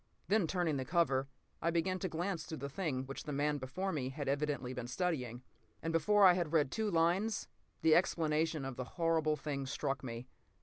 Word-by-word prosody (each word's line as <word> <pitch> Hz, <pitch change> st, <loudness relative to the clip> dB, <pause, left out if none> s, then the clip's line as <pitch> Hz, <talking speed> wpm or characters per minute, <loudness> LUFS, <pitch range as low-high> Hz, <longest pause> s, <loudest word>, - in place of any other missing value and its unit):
Then, 205 Hz, -4 st, +3 dB
turning 170 Hz, -4 st, 0 dB
the 130 Hz, -, -1 dB
cover, 135 Hz, -4 st, +2 dB, 0.3 s
I 170 Hz, -, +2 dB
began 175 Hz, +3 st, 0 dB
to 185 Hz, -, -2 dB
glance 170 Hz, 0 st, -2 dB
through 160 Hz, -, -5 dB
the 140 Hz, -, -5 dB
thing 140 Hz, -5 st, -2 dB
which 135 Hz, +1 st, -7 dB
the 150 Hz, -, -4 dB
man 145 Hz, +1 st, 0 dB
before 180 Hz, +10 st, -3 dB
me 130 Hz, -6 st, -2 dB
had 145 Hz, +1 st, -5 dB
evidently 140 Hz, -2 st, -1 dB
been 125 Hz, -2 st, -5 dB
studying. 125 Hz, -5 st, -2 dB, 0.4 s
And 165 Hz, 0 st, -1 dB
before 205 Hz, +5 st, +5 dB
I 180 Hz, -, +9 dB
had 170 Hz, -3 st, -1 dB
read 150 Hz, -4 st, +3 dB
two 220 Hz, -1 st, 0 dB
lines, 180 Hz, +5 st, +1 dB, 0.4 s
the 160 Hz, -1 st, +6 dB
explanation 160 Hz, -3 st, +2 dB
of 135 Hz, -2 st, -5 dB
the 130 Hz, -, -2 dB
whole 165 Hz, +6 st, -4 dB
horrible 160 Hz, -2 st, +3 dB
thing 140 Hz, -2 st, -4 dB
struck 135 Hz, 0 st, -2 dB
me. 120 Hz, 0 st, -6 dB
155 Hz, 205 wpm, -35 LUFS, 135-175 Hz, 0.4 s, I